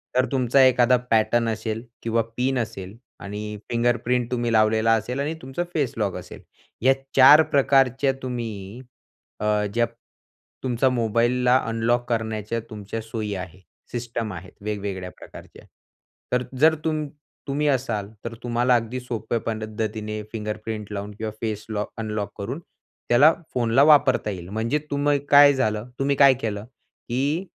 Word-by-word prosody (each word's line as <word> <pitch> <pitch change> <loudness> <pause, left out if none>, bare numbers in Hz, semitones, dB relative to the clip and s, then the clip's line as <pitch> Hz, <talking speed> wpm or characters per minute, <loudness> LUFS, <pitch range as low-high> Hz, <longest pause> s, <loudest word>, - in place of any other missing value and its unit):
तर 130 - +4
तुमचा 130 0 +4
एखादा 125 0 +4
पॅटर्न 115 +1 +3
असेल 110 0 -3 0.2
किंवा 115 0 +1 0.2
पिन 130 +1 +1
असेल 105 -3 -5 0.2
आणि 105 +1 -6
फिंगरप्रिंट 120 +1 +1
तुम्ही 120 -1 0
लावलेला 110 +1 +4
असेल 120 +5 -3
आणि 150 +3 -1
तुमचा 135 +6 -3
फेस 140 -6 0
लॉक 100 -4 -1
असेल. - - -10 0.4
या 130 +2 +5 0.2
4 135 +4 +9
प्रकारच्या 135 -1 +3
तुम्ही 115 -3 -5 0.6
अ, 105 0 +1
ज्या 120 0 +3 0.8
तुमचा 130 0 +2
मोबाईलला 120 +1 +2
अनलॉक 115 +2 +1
करण्याच्या 110 -1 -2
तुमच्या 105 +1 -6
सोयी 110 -2 -4
आहे, 90 0 -7 0.3
सिस्टम 115 -3 -4
आहेत 90 +1 -9
वेगवेगळ्या 100 -3 -4
प्रकारच्या. - - -13 0.7
तर 125 0 +2 0.2
जर 160 +2 +6
तुम 155 -1 -1 0.4
तुम्ही 145 +2 0
असाल, 120 -7 0 0.2
तर 115 - -4
तुम्हाला 120 +1 +2
अगदी 120 +2 -1
सोप्या 115 -2 -3
पद्धतीने 110 -1 -3
फिंगरप्रिंट 105 -1 -5
लावून 105 0 -5
किंवा 110 -1 -3
फेस 105 -2 -3
लॉ 105 -1 -2
अनलॉक 105 -2 -3
करून 120 +10 -4
त्याला 150 -3 +2 0.2
फोनला 120 +2 +3
वापरता 145 -7 +5
येईल. 90 -3 -6
म्हणजे 115 +8 -1
तुम्ही 145 0 +2
काय 145 0 +8
झालं? 110 -3 -1
तुम्ही 140 +1 +1
काय 140 -1 +7
केलं, 105 -2 -3
की 135 +6 -4
115 Hz, 140 wpm, -24 LUFS, 110-130 Hz, 0.8 s, 4